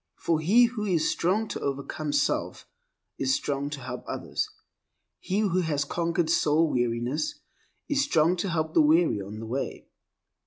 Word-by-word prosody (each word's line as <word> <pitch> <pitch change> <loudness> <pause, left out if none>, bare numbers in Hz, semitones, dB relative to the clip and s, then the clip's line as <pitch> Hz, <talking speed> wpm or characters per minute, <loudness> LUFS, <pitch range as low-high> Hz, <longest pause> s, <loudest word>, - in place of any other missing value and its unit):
For 165 -2 0
he 205 +10 +5
who 230 -3 -3
is 175 -6 +1
strong 205 +6 0
to - - -4
overcome 140 +2 -3
self 145 0 -1 0.5
is 130 -1 +2
strong 140 0 -2
to 145 -2 -6
help 125 - -6
others. - - -3 0.7
He 195 +3 -1
who 185 -3 +1
has 150 -4 0
conquered 170 +1 0
soul 160 0 +3
weariness 120 +4 -1 0.5
is 285 -2 +2
strong 170 - +3
to 190 +3 -1
help 160 -2 -1
the - - +5
weary 155 -7 +3
on 100 +2 -7
the 115 - -6
way. 125 +5 -4
155 Hz, 160 wpm, -27 LUFS, 140-175 Hz, 0.7 s, he